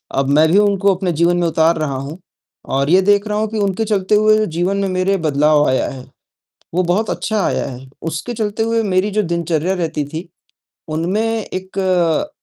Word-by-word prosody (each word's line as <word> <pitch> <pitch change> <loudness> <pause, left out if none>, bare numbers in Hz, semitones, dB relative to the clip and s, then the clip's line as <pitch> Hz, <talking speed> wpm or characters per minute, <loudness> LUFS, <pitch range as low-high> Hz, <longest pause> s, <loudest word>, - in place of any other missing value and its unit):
अब 135 0 0
मैं 155 - +5
भी 195 - +4
उनको 200 -1 +3
अपने 185 -1 -2
जीवन 170 +2 +2
में 175 - +1
उतार 165 +1 +2
रहा 145 -3 -2
हूँ 140 +5 -6 0.6
और 140 +2 +1
ये 185 +2 +5
देख 205 +2 +2
रहा 210 0 -1
हूँ 220 - 0
कि 220 - -4
उनके 200 +2 0
चलते 205 -1 +1
हुए 215 0 +4
जीवन 185 +3 0
में 200 -1 0
मेरे 185 +2 +1
बदलाव 150 -1 +2
आया 130 - +1
है, 130 -1 -9 0.7
वो 185 - +1
बहुत 190 +5 0
अच्छा 215 -2 -1
आया - - -1
है। 130 +1 -10 0.2
उसके 160 +10 -5
चलते 215 -1 -2
हुए 230 0 +1
मेरी 195 0 0
जो 215 +1 +1
दिनचर्या 170 +1 -1
रहती 160 -5 -2
थी, 160 +4 -7 0.6
उनमें 170 +7 -1 0.2
एक 185 - -1
185 Hz, 195 wpm, -18 LUFS, 160-205 Hz, 0.7 s, मैं